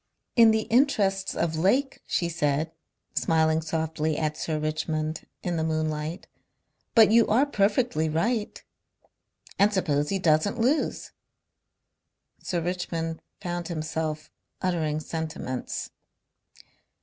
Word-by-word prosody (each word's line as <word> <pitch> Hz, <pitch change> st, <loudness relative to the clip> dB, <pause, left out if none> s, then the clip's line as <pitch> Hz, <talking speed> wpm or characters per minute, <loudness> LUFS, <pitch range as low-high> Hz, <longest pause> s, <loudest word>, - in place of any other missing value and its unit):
"In 230 Hz, -2 st, +8 dB
the 220 Hz, 0 st, +2 dB
interests 210 Hz, -7 st, +2 dB
of 165 Hz, -1 st, 0 dB
Lake," 250 Hz, -, +1 dB
she 170 Hz, -, 0 dB
said, 155 Hz, -1 st, 0 dB, 0.4 s
smiling 160 Hz, -1 st, +2 dB
softly 160 Hz, -1 st, -1 dB
at 155 Hz, -1 st, -1 dB
Sir 155 Hz, 0 st, -2 dB
Richmond 155 Hz, 0 st, -2 dB, 0.2 s
in 175 Hz, -2 st, -1 dB
the 160 Hz, -, 0 dB
moonlight. 155 Hz, +2 st, -2 dB, 0.7 s
"But 220 Hz, -2 st, +7 dB
you 230 Hz, 0 st, +5 dB
are 245 Hz, +7 st, +4 dB
perfectly 205 Hz, -, +1 dB
right." 210 Hz, +8 st, -1 dB, 1.0 s
"And 200 Hz, +2 st, +5 dB
suppose 150 Hz, -7 st, 0 dB
he 195 Hz, -, +1 dB
doesn't 170 Hz, +4 st, +2 dB
lose!" 265 Hz, +7 st, 0 dB, 1.3 s
Sir 175 Hz, -2 st, -2 dB
Richmond 165 Hz, -2 st, -3 dB, 0.2 s
found 175 Hz, -2 st, -3 dB
himself 155 Hz, -1 st, -3 dB, 0.3 s
uttering 160 Hz, -5 st, 0 dB
sentiments. 155 Hz, -5 st, -4 dB
165 Hz, 110 wpm, -26 LUFS, 155-200 Hz, 1.3 s, In